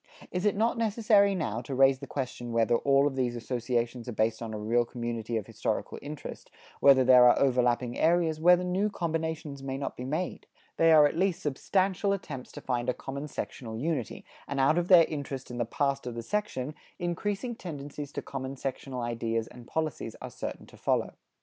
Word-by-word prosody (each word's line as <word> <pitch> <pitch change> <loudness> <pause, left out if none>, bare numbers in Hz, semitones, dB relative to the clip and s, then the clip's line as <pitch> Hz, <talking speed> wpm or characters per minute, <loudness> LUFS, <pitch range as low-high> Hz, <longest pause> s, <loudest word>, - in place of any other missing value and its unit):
It 180 0 -2
is 205 - +3
not 230 +3 +1
necessary 210 -3 +3
now 120 - -2
to 130 +2 -5
raise 135 0 +5
the 140 - -8
question 125 -3 -4
whether 115 0 +2
all 140 +3 +3
of 145 -2 0
these 125 -2 0
associations 120 0 -2
are - - -4
based 110 +1 0
on 115 -1 -4
a 110 - -4
real 115 +3 +2
community 120 -1 -3
of 105 - -3
historical - - -3
interest, 150 0 -8 0.3
whether 135 -2 +7
there 125 -1 +8
are - - +4
overlapping 125 -2 +2
areas, 165 -1 +2
whether 180 +1 +6
new 185 +4 +1
combinations 160 -5 -3
may 135 0 -4
not 140 - -4
be 125 - -6
made? 155 +7 -3 0.3
They 165 0 +5
are 155 -2 +8
at 145 - +1
least 190 -2 +1
substantial 190 +7 +1
attempts 145 -10 -6
to - - -8
find 125 -1 -1
a 125 - 0
common 140 +2 -6
sectional 115 -5 -6
unity, 140 -2 -3 0.2
and 140 0 -3
out 145 +5 +4
of 175 - -1
their 175 -3 +8
interest 140 -5 -5
in 120 - -5
the 120 - +1
past 140 +2 -1
of 120 - -5
the 115 - -5
section, 155 - -2 0.2
increasing 200 +6 -2
tendencies 145 -5 -7
to - - -4
common 135 0 -5
sectional 130 -1 -4
ideas 115 -1 -1
and 120 -1 -13
policies 160 -2 -3
are - - -7
certain - - -6
to - - -17
follow. - - 0
135 Hz, 195 wpm, -29 LUFS, 120-165 Hz, 0.3 s, there